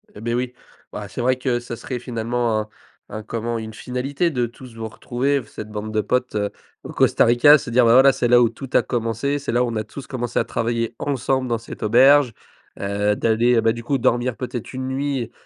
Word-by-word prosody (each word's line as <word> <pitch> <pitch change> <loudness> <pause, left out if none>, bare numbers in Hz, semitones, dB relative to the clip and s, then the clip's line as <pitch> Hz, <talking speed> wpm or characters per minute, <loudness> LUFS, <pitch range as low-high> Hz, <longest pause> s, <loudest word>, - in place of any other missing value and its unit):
Eh, 105 - -10
beh, 120 +1 -2
oui, 125 +1 -2 0.4
bah, - - -6
c'est - - -6
vrai 130 +1 +2
que 125 -2 0
ça 120 -1 -7
serait 125 +1 -5
finalement 115 -1 -1
un 105 - -9 0.4
un 110 0 -6
comment, 115 +1 -3
une 110 -1 -6
finalité 135 +8 -2
de 125 -6 0
tous 120 0 -12
vous 115 -1 -5
retrouver, 135 +5 -1
f 115 - -16
cette 110 - -8
bande 105 +1 -5
de 110 - 0
potes, 125 +1 -1
heu, 105 -1 -1 0.3
au - - -8
Costa - - +3
Rica. 120 +6 +7
Se 135 -4 -7
dire, 125 +1 +4
bah, 115 0 +5
voilà, 135 +2 +7
c'est 120 - 0
là 120 0 +6
où 120 -2 +4
tout 130 +3 -9
a - - +4
commencé. 120 +4 -1
C'est 140 - -4
là 120 +1 +2
où - - 0
on 115 - -4
a 110 - -1
tous 130 +5 -10
commencé 120 -2 -4
à - - +3
travailler 115 0 -2
ensemble 130 -1 -1
dans 120 -1 0
cette 115 +1 -10
auberge. 130 +3 +5 0.5
Heu, 100 +1 0
d'aller, 115 +3 +2
heu, 115 - +3
bah, 115 0 +3
du 120 - -8
coup, 135 +4 0
dormir 120 -1 0
peut-être 125 -1 -6
1 130 0 -4
nuit, 135 -3 -2
120 Hz, 235 wpm, -21 LUFS, 115-130 Hz, 0.5 s, Rica